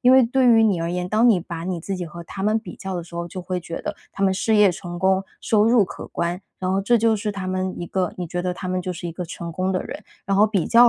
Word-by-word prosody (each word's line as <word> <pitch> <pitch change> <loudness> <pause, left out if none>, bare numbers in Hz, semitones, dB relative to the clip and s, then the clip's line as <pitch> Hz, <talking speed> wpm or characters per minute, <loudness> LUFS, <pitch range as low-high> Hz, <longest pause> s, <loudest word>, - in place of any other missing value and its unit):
因 250 - +5
为 260 0 +8
对 255 +2 +2 0.2
你 195 -6 +2
而 165 0 -1
言， 180 0 -2
当 225 +3 +5
你 215 -6 +5
把 170 -1 -6
你 180 -1 -2
自 195 +4 -4
己 180 -2 -4
和 170 +2 -9
他 195 - -7
们 215 +2 +3
比 220 - -9
较 190 -2 -5
的 175 - -4
时 170 - -14
候， 170 0 -3
就 185 - -6
会 180 0 -2
觉 170 0 -6
得 - - -3 0.2
他 195 - -5
们 190 - +3
事 215 +3 +2
业 205 -3 +6
成 175 0 -7
功、 190 +1 +3 0.2
收 215 -2 +3
入 230 -3 +5
可 - - -8
观， 175 +1 -2 0.2
然 185 -1 -1
后 195 - +2
这 235 +5 +3
就 225 0 +3
是 210 0 -2
他 195 -2 -5
们 185 0 -1
一 175 - -4
个 185 -1 -1
你 180 - -4
觉 175 +2 -3
得 180 0 -1
他 185 - -5
们 185 0 0
就 185 - -3
是 175 0 -6
一 - - -5
个 180 +2 -5
成 170 +1 -6
功 185 +3 -1
的 185 - 0
人， - - -8 0.2
然 195 0 +1
后 210 +2 +6
比 200 -5 0
较 240 +1 +7
185 Hz, 330 characters per minute, -23 LUFS, 175-210 Hz, 0.2 s, 为